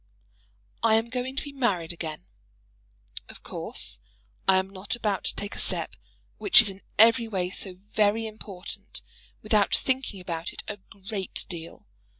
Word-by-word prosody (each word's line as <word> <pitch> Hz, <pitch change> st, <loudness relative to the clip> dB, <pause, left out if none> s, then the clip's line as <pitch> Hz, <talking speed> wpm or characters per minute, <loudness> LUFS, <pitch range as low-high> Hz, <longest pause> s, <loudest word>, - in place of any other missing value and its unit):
I 225 Hz, -1 st, +5 dB
am 225 Hz, +1 st, +1 dB
going 255 Hz, +1 st, -2 dB
to -, -, -2 dB
be 285 Hz, -, -7 dB
married 200 Hz, -12 st, 0 dB
again. 160 Hz, -2 st, -6 dB, 1.0 s
Of -, -, -11 dB
course -, -, +4 dB, 0.5 s
I 190 Hz, -, +7 dB
am 190 Hz, 0 st, +2 dB
not 195 Hz, +6 st, -4 dB
about 210 Hz, -4 st, -1 dB
to -, -, -1 dB
take 205 Hz, 0 st, -4 dB
a -, -, -6 dB
step -, -, +1 dB, 0.4 s
which 375 Hz, -, +7 dB
is 220 Hz, -4 st, +5 dB
in 190 Hz, +1 st, -13 dB, 0.2 s
every 230 Hz, +1 st, +6 dB
way 185 Hz, -4 st, -2 dB
so 190 Hz, -1 st, -3 dB, 0.2 s
very 215 Hz, +1 st, +2 dB
important 210 Hz, -4 st, -6 dB, 0.4 s
without 215 Hz, -2 st, +3 dB
thinking 260 Hz, -6 st, 0 dB
about 170 Hz, -1 st, -4 dB
it -, -, -4 dB
a 205 Hz, -, -4 dB
great 195 Hz, 0 st, -5 dB
deal. 165 Hz, -, -6 dB
205 Hz, 155 wpm, -27 LUFS, 185-225 Hz, 1.0 s, I